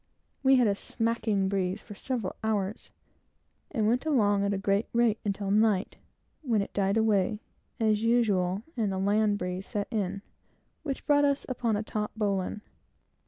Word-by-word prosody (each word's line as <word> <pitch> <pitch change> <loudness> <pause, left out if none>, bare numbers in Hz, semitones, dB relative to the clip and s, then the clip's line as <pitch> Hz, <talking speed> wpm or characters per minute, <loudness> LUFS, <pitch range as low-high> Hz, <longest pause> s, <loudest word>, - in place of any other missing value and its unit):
We 270 -1 +5
had 250 -2 +4
a 205 - +3
smacking 220 -2 -1
breeze 190 -1 -1
for 210 - -11
several 225 -1 -3
hours, 215 -1 -2 0.8
and 220 - 0
went 240 +3 +2
along 210 -10 +2
at 200 - +1
a 200 - 0
great 200 +2 +1
rate, 235 -2 +3
until 200 -1 -2
night, 210 -2 +2 0.4
when 230 -9 +1
it - - -10
died 200 +1 +1
away, 210 -1 +2 0.4
as 215 -2 +2
usual, 210 -5 +2
and 215 -5 0
the 190 - -2
land 205 +2 +2
breeze 180 0 -4
set 205 -3 -3
in, 200 -2 -2 0.6
which 275 -4 -5
brought 290 0 +4
us 280 -1 +1
upon 235 -3 -1
a 205 - -1
taut 210 -1 -3
bowline. 200 -1 -1
210 Hz, 165 wpm, -28 LUFS, 200-230 Hz, 0.8 s, We